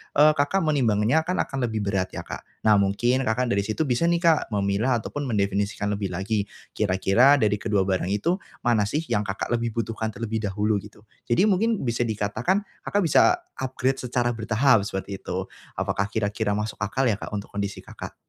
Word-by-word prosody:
eee, 150 +1 +7
Kakak 145 +7 +2
menimbangnya 135 -1 +2
kan 180 - 0
akan 135 -2 -2
lebih 110 -2 -2
berat 95 -2 0
ya - - -5
Kak. - - -6 0.2
Nah 110 -1 +5
mungkin 120 +7 +1
Kakak 120 +2 +1
dari 100 - +2
situ 110 +9 0
bisa 140 +5 +1
nih 170 0 +2
Kak, 165 -3 +3
memilah 100 +5 +1
ataupun 145 -1 -4
mendefinisikan 100 -1 0
lebih 100 -1 -2
lagi. 100 +3 -1 0.2
Kira-kira 105 +7 +4
dari 105 -1 +2
kedua 105 -3 +1
barang 95 -1 -1
itu, 105 - 0 0.3
mana 110 -4 +2
sih 150 +9 -1
yang 105 0 +1
Kakak 95 +4 -3
lebih 115 -1 -1
butuhkan 115 -1 -2
terlebih 110 -1 -3
dahulu, 105 +1 0
gitu? 105 +1 -14 0.2
Jadi 120 +11 +3
mungkin 215 +1 +1
bisa 120 -1 0
dikatakan 115 - 0 0.2
Kakak 205 0 +1
bisa 170 - +5 0.2
upgrade 130 0 -1
secara 120 -1 0
bertahap, 115 -1 +2
seperti 95 0 -5
itu. - - -3 0.3
Apakah 100 - -1
kira-kira 105 0 -1
masuk 105 +1 -4
akal 110 +5 -1
ya, 100 - -1
Kak - - -7
untuk 100 - -6
kondisi 100 0 -4
Kakak? - - -9
110 Hz, 185 wpm, -25 LUFS, 100-130 Hz, 0.3 s, eee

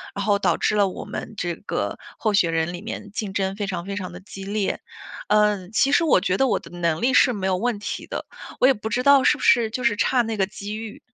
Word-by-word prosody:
然 200 - -2
后 205 -1 +2
导 - - +2
致 - - 0
了 205 -1 +4
我 185 - -6
们 - - -7
这 175 -4 -2
个 - - -3 0.2
候 215 -2 0
选 175 -4 +3
人 165 +1 0
里 175 0 -7
面 210 -1 -7
竞 205 -1 -4
争 195 -1 -1
非 205 -2 -2
常 180 -3 -4
非 200 +1 -4
常 180 -3 -5
地 180 - -10
激 195 0 -9
烈。 205 0 -1 0.5
嗯， 210 -3 +2
其 275 +5 +3
实 330 +3 +4
我 275 - +4
觉 185 0 0
得 270 - +3
我 - - +1
的 - - -14
能 165 -2 0
力 255 +2 +2
是 255 -2 +5
没 195 -3 -2
有 185 -1 +1
问 230 +1 -1
题 205 - -5
的， - - -5 0.4
我 - - +7
也 270 - +5
不 215 -2 -6
知 245 +3 -1
道 280 -1 +6
是 - - +5
不 - - -8
是 235 -2 +4
就 250 +2 -4
是 235 -3 +2
差 250 +3 +3
那 225 -2 -3
个 195 - +2
机 205 +1 -6
遇。 220 -1 -8
205 Hz, 290 characters per minute, -23 LUFS, 190-225 Hz, 0.5 s, 我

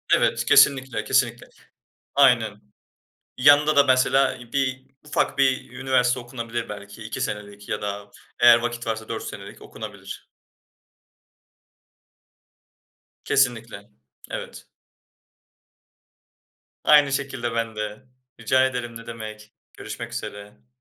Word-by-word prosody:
Evet, - - +1
kesinlikle, 130 -5 +4
kesinlikle. 125 -2 0 0.7
Aynen. 115 -7 +3 0.8
Yanında 145 +3 +5
da 140 - +7
mesela 130 0 +3
i 120 -1 -14
bir 130 -1 -1 0.2
ufak 145 -1 -1
bir 130 -3 +1
üniversite 125 -1 +1
okunabilir 120 -1 -6
belki 100 +1 -9
2 110 0 -5
senelik 100 0 -6
ya - - -2
da 100 0 -5 0.3
eğer 120 -1 +7
vakit 120 0 -4
varsa 110 0 -4
4 - - -4
senelik - - -9
okunabilir. - - -10 2.9
Kesinlikle. 115 -5 0 0.4
Evet. - - -7 2.2
Aynı 145 -2 +6
şekilde 130 -4 -3
ben 115 -1 -2
de. 105 +1 -6 0.3
Rica 130 +3 +3
ederim, 120 -3 -4
ne 115 - -13
demek. 110 -2 -9 0.2
Görüşmek - - -8
üzere. 100 -10 -8
120 Hz, 105 wpm, -23 LUFS, 110-130 Hz, 2.9 s, da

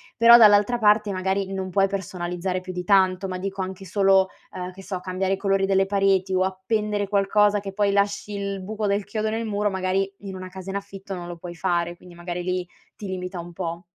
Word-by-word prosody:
però 235 0 +8
dall'altra 210 +2 +6
parte 210 -1 +3
magari 190 +1 -1
non 190 -1 -3
puoi 195 +1 +3
personalizzare 185 -1 -3
più 185 0 -7
di 180 0 -4
tanto, 190 -1 +3
ma 185 -1 -4
dico 195 0 -4
anche 190 +1 -5
solo, 195 0 +3 0.2
uhm, 180 0 -6
che 195 +1 -13
so, 185 -2 -4
cambiare 190 +1 -1
i - - -1
colori 195 -1 +1
delle 195 0 +3
pareti 195 -1 +2
o 185 0 +3
appendere 205 +2 -1
qualcosa 205 +1 +3
che 195 -1 -7
poi 205 0 +2
lasci 200 +1 0
il 200 -1 -3
buco 210 +2 -4
del 200 0 +1
chiodo 215 +1 -2
nel 225 +1 -2
muro, 205 -1 0
magari 190 +1 0
in 195 -2 -7
una 185 0 -7
casa 190 +1 -9
in 195 - -4
affitto 195 -1 -8
non 175 -1 -7
lo 175 - -6
puoi 175 0 -8
fare, 175 -1 -1
quindi 175 -1 -15
magari 175 0 -5
lì 180 0 -1 0.3
ti 205 - -8
limita 180 -1 -5
un 175 +1 -8
po'. 170 0 -5
195 Hz, 220 wpm, -24 LUFS, 185-200 Hz, 0.3 s, però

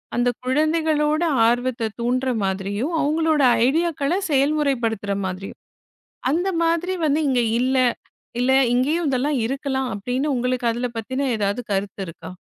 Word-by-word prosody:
அந்த 245 +1 +2 0.2
குழந்தைகளுடைய 310 +3 +1 0.2
ஆர்வத்தை 245 0 0
தூண்டுகிற 255 +2 0
மாதிரியும், 200 - -2
அவர்களுடைய 305 -2 +3 0.2
ஐடியா 330 +6 +2
க்களை 295 +7 0
செயல்முறைப்படுத்துற 265 -8 +1
மாதிரியும். 185 +1 -6 0.7
அந்த 350 +6 +1
மாதிரி 335 +2 +1
வந்து 300 0 +2
இங்கு 250 -2 +2 0.2
இல்லை; 255 0 +3 0.5
இல்லை 265 +2 +3 0.2
இங்கேயும் 300 +7 +1
இதெல்லாம் 275 +1 0
இருக்கலாம் 265 +1 -2
அப்படியென்று 255 +8 -1
உங்களுக்கு 250 0 -1
அதில் 240 +1 -4
பற்றிய 260 +5 -2
ஏதாவது 205 +3 -1
கருத்து 195 0 -2
இருக்கிறதா? 165 - -9
260 Hz, 125 wpm, -22 LUFS, 240-300 Hz, 0.7 s, அவர்களுடைய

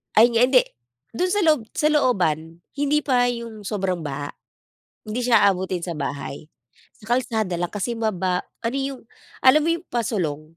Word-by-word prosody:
Ayun 235 +3 +7
nga 240 - +5
hindi, 255 -1 +6 0.5
do'n 360 +10 -1
sa 410 - +2
loob 310 -5 +4
sa 300 - +2
looban, 170 - +1 0.2
hindi 290 +1 +2
pa 245 -3 +3
yung 230 -4 -5
sobrang 190 -4 -1
baha. 145 0 -4 0.7
Hindi 215 +3 -3
siya 230 -3 +5
aabutin 185 -2 -3
sa 175 - -4
bahay. 145 +1 -5 0.6
Sa 220 +3 -3
kalsada 220 -8 -1
lang 175 - -2
kasi 210 +4 -2
maba 185 -5 -1 0.2
ano 235 +4 -1
yung, 270 -1 -3 0.4
alam 265 +4 +7
mo 330 - +1
yung 335 +2 -5
pasulong? 185 -11 -1
220 Hz, 165 wpm, -23 LUFS, 180-255 Hz, 0.7 s, Ayun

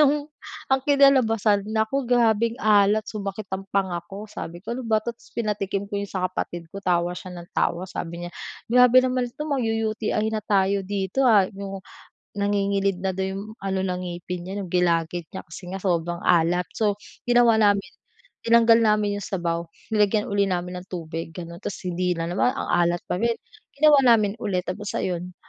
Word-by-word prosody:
Nung 295 +1 +2 0.4
ang 265 - +4
kinalabasan, 230 -8 +3
naku! 220 +4 0
Grabeng 230 -1 +3
alat, 215 -2 +3
sumakit 200 0 -5
ang 195 +1 -4
panga 190 -3 0
ko. 200 +2 -7
Sabi 175 -4 -8
ko, 230 - -4
"Ano 255 - -4
ba 220 -3 0
'to?" 235 - -2
ta's - - -22
pinatikim 205 -3 -1
ko 200 - -1
yun 200 - -5
sa 185 -1 -3
kapatid 170 -2 -5
ko, 200 - -6
tawa 175 -1 +1
siya 180 0 -8
ng 175 0 -11
tawa, 175 +2 0
sabi 175 -2 -6
niya, 175 - -7 0.3
"Grabe 250 +1 +6
naman 255 -1 0
'to 300 +5 -7
magyu-UTI 225 -5 -1
na 215 - -1
tayo 200 -1 +2
dito, 200 +6 0
ah", 210 -4 +6
yung 195 -1 -7 0.5
nangingilid 200 -2 0
na 190 - 0
daw 190 +1 -2
yung 195 +1 -4
ano 190 -1 -2
ng 180 -1 -2
ngipin 175 0 -6
niya, 190 - -5
yung 180 - -8
gilagid 170 -1 +1
niya - - -5
kasi 180 +3 -9
nga 190 +1 -6
sobrang 175 -2 -1
alat. 175 +1 +3
So, 210 -2 +2 0.3
ginawa 240 -2 +5
namin, 200 -3 +3 0.6
tinanggal 230 0 +6
namin 210 -2 +2
yung 205 - -6
sabaw, 170 -3 -2 0.2
nilagyan 210 0 +3
ulit 200 0 +2
namin 180 -1 -3
ng 185 - -14
tubig, 165 -2 -6
gano'n, 170 -1 -8
tapos 200 - -6
hindi 180 0 -1
na 165 +1 -3
naman 245 +7 +1
ang - - -4
alat 175 0 +2
pa 180 - -3
rin, 235 +1 +1 0.4
ginawa 295 -1 +6
namin 210 -1 +1
ulit, 185 -4 -1
tapos 200 +3 -5
ayon, 180 0 -3
200 Hz, 185 wpm, -24 LUFS, 180-220 Hz, 0.6 s, Grabe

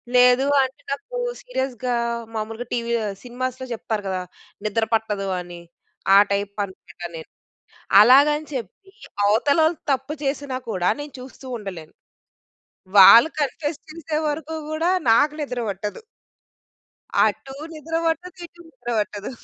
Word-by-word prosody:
లేదు 250 +2 +5 0.2
అంటే, 265 +1 -6
నాకు 485 - -5 0.2
సీరియస్‌గా 260 - -2 0.4
మాములుగా 225 +2 -4
టీవీ 235 0 -1
ఆహ్, 200 -1 -4
సినిమాస్‌లో 255 +1 -4
చెప్తారు 220 -2 -3
గదా! 185 -1 -2 0.4
నిద్ర 220 +2 +1
పట్టదు 210 -3 0
అని. 175 -1 -10 0.6
ఆ - - +9
టైప్ 200 0 -1
అనమాట 175 -2 -16
నేను. 160 - -9 0.7
అలాగని 285 +6 +6
చెప్పి 260 - -7 0.3
అవతల 230 +9 +3
వాళ్ళు 320 +1 +2
తప్పు 270 +2 -1
చేసినా 275 -1 -2
కూడా 180 -2 0
నేను 290 -1 -9
చూస్తూ 260 +1 -12
ఉండలేను. 180 -7 -8 1.1
వాళ్ళు 230 +9 +10
కన్ఫెస్ 295 +2 -2
చేసే 310 -1 -3
వరకు 315 +1 -4 0.2
కూడా 320 +2 0 0.2
నాకు 290 +6 +4
నిద్ర 250 -4 -3
పట్టదు... 205 +2 -5 1.3
అటు 270 - -3 0.2
నిద్ర 320 +1 -6
పట్టదు. 355 +2 -3
ఇటు 345 +1 -16
నిద్ర 250 -5 -9
పట్టదు. 205 0 -4
255 Hz, 125 wpm, -23 LUFS, 210-295 Hz, 1.3 s, వాళ్ళు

